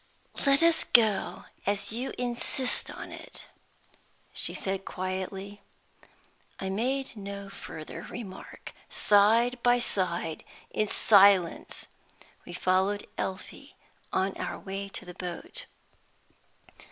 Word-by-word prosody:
"Let 275 +3 +6
us 335 -1 +5
go, 210 -5 +3 0.2
as 200 0 +1
you 250 +4 -2
insist 250 +2 -1
on - - -8
it," - - -10 0.9
she - - -1
said, 195 0 -2
quietly. 190 +2 -4 1.0
I 190 0 -2
made 260 +6 -1
no 200 -1 -6
further 160 -5 -8
remark. 200 -6 -8 0.2
Side 230 +4 +4
by 245 0 +5
side, 175 -8 -1 0.3
in 215 - +1
silence 200 -4 +5 0.6
we - - -7
followed 190 +3 +1
Elfie 190 0 -5 0.4
on 190 +1 +1
our - - -3
way 195 +1 -5
to 195 - -6
the 180 - -8
boat. 180 - -5
200 Hz, 105 wpm, -29 LUFS, 190-235 Hz, 1.0 s, Let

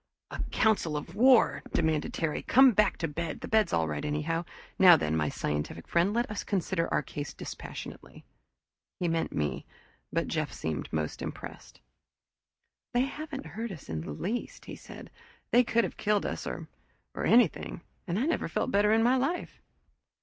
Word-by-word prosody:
"A - - -4
council 200 -9 +2
of 165 +3 -7
war!" 230 - +5
demanded 160 -2 +1
Terry. 160 -3 -2
"Come 265 +2 +6
on - - +3
back 210 -2 +3
to 165 - -1
bed 160 +1 -4
the - - -5
bed's 215 -5 +3
all 80 -1 +1
right 75 -1 -3
anyhow. 155 +3 -1 0.3
Now 180 -3 +9
then, 80 - -1
my 75 -2 +1
scientific 75 +2 -3
friend, 170 +4 +2
let 235 +3 0
us 210 - -3
consider 185 -3 -1
our - - +1
case 145 +1 -6
dispassionately." - - -8 0.7
He 175 - 0
meant 165 0 0
me, 75 -1 -2 0.5
but - - 0
Jeff - - -1
seemed 80 -3 -4
most 80 -1 -2
impressed. - - -8 1.1
"They 245 - +5
haven't 280 +1 -4
hurt 230 +1 -5
us 165 -7 -10
in 80 -1 -3
the 80 - -7
least!" 205 - -4
he - - -7
said. - - -11 0.4
"They 245 - +6
could 235 0 +2
have - - -4
killed 210 -1 +1
us - - -3
or - - -5 0.5
or - - -4
anything 230 -7 +3 0.3
and 175 +1 -1
I 245 - +1
never 330 - 0
felt - - -1
better 205 +1 +4
in 225 +1 +4
my 250 +2 +4
life." 280 +8 -2
175 Hz, 180 wpm, -29 LUFS, 150-230 Hz, 1.1 s, Now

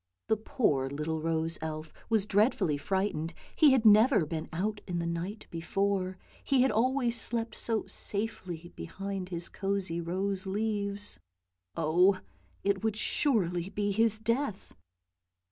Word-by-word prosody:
The 220 - +3
poor 145 - 0
little 155 +3 -3
rose 165 0 0
elf 155 0 -5 0.2
was 220 -3 +2
dread 210 +4 +3
fully 165 -7 0
frightened, 190 -2 -1 0.2
he 300 -3 +6
had 255 -4 +3
never 215 - +6
been 155 +1 -4
out 205 +6 -2
in 175 -2 -2
the 170 - -1
night 170 +6 -4
before; 185 +2 -1 0.3
he 265 -2 +3
had 265 - +3
always 240 0 +1
slept 230 -1 0
so 225 -2 -1
safely 185 -5 -2
behind 195 - -5
his 170 -1 -5
cosy 195 -4 -2
rose 190 +3 -2
leaves. 205 0 -1 0.6
Oh, 175 +4 +3 0.4
it 200 0 +1
would 220 -1 0
surely 190 - +1
be 205 0 -1
his 220 +1 +3
death! 230 0 -2
195 Hz, 140 wpm, -30 LUFS, 170-220 Hz, 0.6 s, he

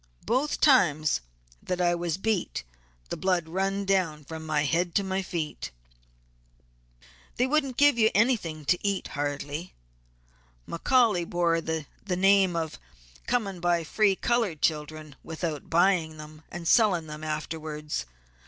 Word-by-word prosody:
Both 270 +5 0
times 155 - +4 0.4
that 180 -1 -3
I 175 -1 +3
was 170 -1 -2
beat 200 - -1 0.5
the - - -3
blood 180 -3 0
run 195 +3 -1
down 180 -6 +1
from 160 +2 -8
my 155 -2 0
head 170 +3 0
to 200 - +3
my 190 0 -1
feet. 170 -5 -4 1.7
"They 250 - +2
wouldn't 275 -2 0
give 285 -4 +5
you 220 -1 +5
anything 195 - +1
to 180 - +2
eat 200 -1 -1
hardly. 145 +3 -4 0.9
McCaully 210 -2 +2
bore 170 -1 +1
the 160 -2 -3 0.2
name 190 0 +4
of 160 -2 -3 0.5
coming 205 -7 -1
by 175 -1 +1
free 200 +4 +2
colored 225 -8 0
children 155 -1 -2
without 160 -2 -4
buying 170 -2 +2
them, 155 0 -11
and 170 0 -6
selling 195 -8 +4
them 150 0 -8
afterwards. 155 - -4
175 Hz, 135 wpm, -27 LUFS, 155-195 Hz, 1.7 s, give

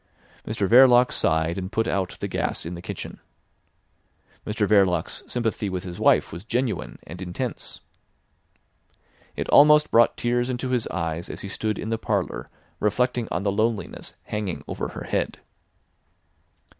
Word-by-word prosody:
Mr 105 -3 -1
Verloc 125 +2 +7
sighed, 80 +2 +1
and 95 +1 -5
put 110 +1 0
out 95 -2 -1
the - - -2
gas - - -2
in 85 - -5
the 85 - -7
kitchen. - - -7 1.3
Mr 105 -1 0
Verloc's 95 -5 +2
sympathy 110 -4 -1
with 90 -1 -3
his 90 -2 -7
wife - - +3
was 85 +3 -7
genuine 120 +1 -2
and 90 +4 -9
intense. 95 +7 -5 1.5
It - - -3
almost 150 +1 +6
brought 115 +1 +5
tears 120 +1 0
into 125 0 -2
his 125 -3 0
eyes 80 +1 -3
as - - -5
he 100 - -6
stood 110 +2 -2
in 110 - -4
the 115 - -1
parlour - - -2 0.3
reflecting 120 +2 +1
on 85 - -2
the 100 - +1
loneliness 110 +1 -2
hanging 105 -4 -4
over - - -3
her - - -7
head. - - -2
105 Hz, 150 wpm, -24 LUFS, 90-120 Hz, 1.5 s, Verloc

